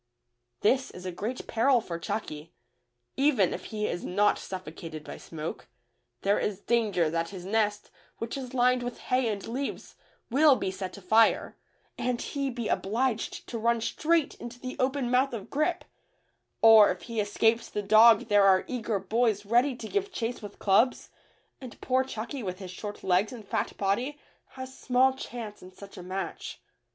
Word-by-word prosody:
This 260 Hz, +5 st, +2 dB
is 180 Hz, 0 st, -11 dB
a 185 Hz, -, -3 dB
great 220 Hz, +8 st, -5 dB
peril 245 Hz, +3 st, +3 dB
for 170 Hz, -6 st, -6 dB
Chucky, 165 Hz, -5 st, -5 dB, 0.3 s
— 120 Hz, -, -51 dB, 0.3 s
even 265 Hz, -, +3 dB
if -, -, -6 dB
he 210 Hz, -1 st, -3 dB
is 175 Hz, -, -3 dB
not 205 Hz, +3 st, +2 dB
suffocated 165 Hz, -4 st, -7 dB
by -, -, -8 dB
smoke, 155 Hz, -5 st, -7 dB, 0.6 s
there 200 Hz, +1 st, +3 dB
is 205 Hz, -2 st, -2 dB
danger 210 Hz, -7 st, +1 dB
that 165 Hz, 0 st, -1 dB
his 185 Hz, -3 st, -9 dB
nest, 210 Hz, 0 st, 0 dB, 0.3 s
which 230 Hz, 0 st, -4 dB
is 260 Hz, -2 st, -6 dB
lined 250 Hz, 0 st, +3 dB
with 245 Hz, 0 st, -5 dB
hay 255 Hz, -1 st, 0 dB
and 205 Hz, -3 st, -3 dB
leaves, 265 Hz, +4 st, -4 dB, 0.4 s
will 285 Hz, +2 st, +6 dB
be 190 Hz, -, -2 dB
set 190 Hz, 0 st, -6 dB
afire, 220 Hz, +4 st, +3 dB, 0.4 s
and 245 Hz, -1 st, -1 dB
he 275 Hz, -1 st, -2 dB
be 235 Hz, -3 st, -4 dB
obliged 225 Hz, +4 st, -1 dB
to 230 Hz, -, -5 dB
run 235 Hz, +1 st, +2 dB
straight 310 Hz, +7 st, +1 dB
into 240 Hz, +1 st, -8 dB
the 255 Hz, 0 st, -6 dB
open 260 Hz, -1 st, 0 dB
mouth 255 Hz, +1 st, +2 dB
of 215 Hz, -4 st, -7 dB
Grip, 305 Hz, +4 st, 0 dB, 0.8 s
or 220 Hz, -2 st, +9 dB
if 180 Hz, -1 st, -3 dB
he 230 Hz, -2 st, -4 dB
escapes 225 Hz, +3 st, +1 dB
the 210 Hz, -, -3 dB
dog 220 Hz, +2 st, +7 dB
there 205 Hz, -2 st, +3 dB
are 190 Hz, -1 st, +5 dB
eager 230 Hz, -4 st, -2 dB
boys 210 Hz, +1 st, 0 dB
ready 245 Hz, +5 st, +3 dB
to 225 Hz, -, -7 dB
give 400 Hz, -, -2 dB
chase 240 Hz, -4 st, -3 dB
with 205 Hz, -, -9 dB
clubs, 220 Hz, +6 st, +2 dB, 0.5 s
and 255 Hz, -3 st, -10 dB
poor 260 Hz, 0 st, +1 dB
Chucky 260 Hz, +2 st, -5 dB
with 185 Hz, -4 st, -4 dB
his 185 Hz, -2 st, -8 dB
short 205 Hz, +2 st, -7 dB
legs 190 Hz, +3 st, +2 dB
and 225 Hz, -5 st, -10 dB
fat -, -, -2 dB
body 240 Hz, +9 st, -1 dB, 0.4 s
has 260 Hz, 0 st, -8 dB
small 260 Hz, +1 st, +3 dB
chance 230 Hz, -5 st, -7 dB
in 185 Hz, -, -12 dB
such 200 Hz, +1 st, -13 dB
a 185 Hz, -, -8 dB
match. 185 Hz, -1 st, -5 dB
225 Hz, 175 wpm, -28 LUFS, 195-250 Hz, 0.8 s, or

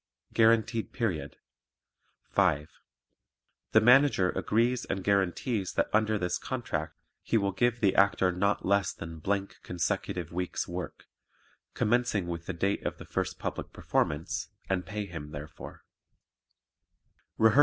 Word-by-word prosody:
Guaranteed 115 Hz, 0 st, +3 dB
Period 85 Hz, -, -2 dB, 0.9 s
5. 75 Hz, +2 st, +2 dB, 1.0 s
The 110 Hz, -, +7 dB
Manager 125 Hz, -6 st, +5 dB
agrees 120 Hz, +3 st, +1 dB
and 95 Hz, -, -3 dB
guarantees 100 Hz, +2 st, 0 dB
that -, -, 0 dB
under 110 Hz, 0 st, +3 dB
this 90 Hz, -3 st, -1 dB
contract 80 Hz, -, -3 dB, 0.2 s
he 115 Hz, -, +1 dB
will 100 Hz, -2 st, +1 dB
give 120 Hz, +5 st, +1 dB
the 100 Hz, -3 st, +4 dB
Actor 95 Hz, -2 st, +4 dB
not 100 Hz, +3 st, 0 dB
less 100 Hz, 0 st, +2 dB
than 80 Hz, -1 st, -8 dB, 0.4 s
consecutive 85 Hz, -1 st, -2 dB
weeks' 90 Hz, +1 st, -2 dB
work, 90 Hz, +1 st, -6 dB, 0.7 s
commencing 120 Hz, -4 st, +1 dB
with 85 Hz, -1 st, -5 dB
the 95 Hz, -, -2 dB
date 100 Hz, +4 st, 0 dB
of -, -, -3 dB
the -, -, -10 dB
first -, -, -2 dB
public -, -, -4 dB
performance, 75 Hz, +2 st, -1 dB, 0.2 s
and 90 Hz, -1 st, -1 dB
pay 105 Hz, -1 st, -3 dB
him 80 Hz, -6 st, -7 dB
therefor. 75 Hz, 0 st, -9 dB
95 Hz, 125 wpm, -29 LUFS, 85-110 Hz, 1.0 s, The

